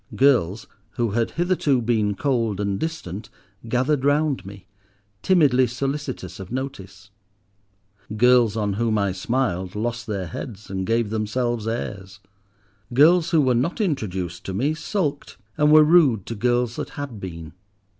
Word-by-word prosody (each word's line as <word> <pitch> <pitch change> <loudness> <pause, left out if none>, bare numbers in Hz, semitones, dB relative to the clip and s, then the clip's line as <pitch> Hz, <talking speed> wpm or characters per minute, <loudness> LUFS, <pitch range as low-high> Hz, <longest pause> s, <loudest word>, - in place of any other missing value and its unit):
Girls 120 -8 +2 0.3
who 120 -4 0
had 115 +2 0
hitherto 170 -6 +2
been 110 -3 0
cold 115 -6 0
and 100 -1 -1
distant 110 - -5 0.4
gathered 130 +3 +1
round 145 -5 +1
me, 100 -1 -11 0.6
timidly 140 -9 +4
solicitous 130 - -4
of 95 +1 -9
notice. 100 -8 -6 1.1
Girls 120 -2 +4
on 105 -2 0
whom 110 +1 0
I 100 -2 +1
smiled 95 -2 -2
lost 115 +2 -3
their 100 -4 -3
heads 100 - -8
and 95 -1 -3
gave 115 -1 +1
themselves 110 +1 -1
airs. 95 -4 -5 0.8
Girls 165 +5 +5
who 165 -3 +4
were 130 -2 +3
not 135 - -1
introduced 95 - -2
to 95 - -4
me 140 +9 +1
sulked 155 -2 -3 0.2
and 150 0 +3
were 155 0 +8
rude 150 - +4
to - - -5
girls 120 +1 0
that - - -4
had 140 -7 -5
been. 85 -4 -8
120 Hz, 145 wpm, -23 LUFS, 100-140 Hz, 1.1 s, were